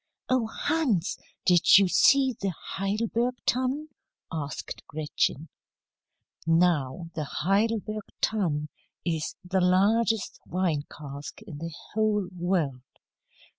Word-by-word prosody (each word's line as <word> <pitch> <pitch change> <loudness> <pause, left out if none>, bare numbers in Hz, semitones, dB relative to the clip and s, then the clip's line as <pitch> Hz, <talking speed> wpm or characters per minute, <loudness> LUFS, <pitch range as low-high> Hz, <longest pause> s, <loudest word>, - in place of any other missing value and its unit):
"Oh, 255 -3 +2
Hans! 240 - 0 0.3
did 175 0 +7
you 195 -1 +5
see 265 +7 +5
the 195 - +1
Heidelberg 225 +5 -1
Tun?" 260 +5 0 0.4
asked 150 -3 -5
Gretchen. 150 0 -1 1.0
Now, 165 -1 +2
the 160 -4 -2
Heidelberg 215 +5 0
Tun 155 -9 0 0.4
is 160 -3 -1
the 190 +1 +1
largest 205 +4 +2
wine 170 -5 0
cask 145 +6 -9
in 165 -9 -9
the 165 +1 -5 0.2
whole 210 -3 +1
world. 170 -7 0
190 Hz, 100 wpm, -27 LUFS, 165-220 Hz, 1.0 s, did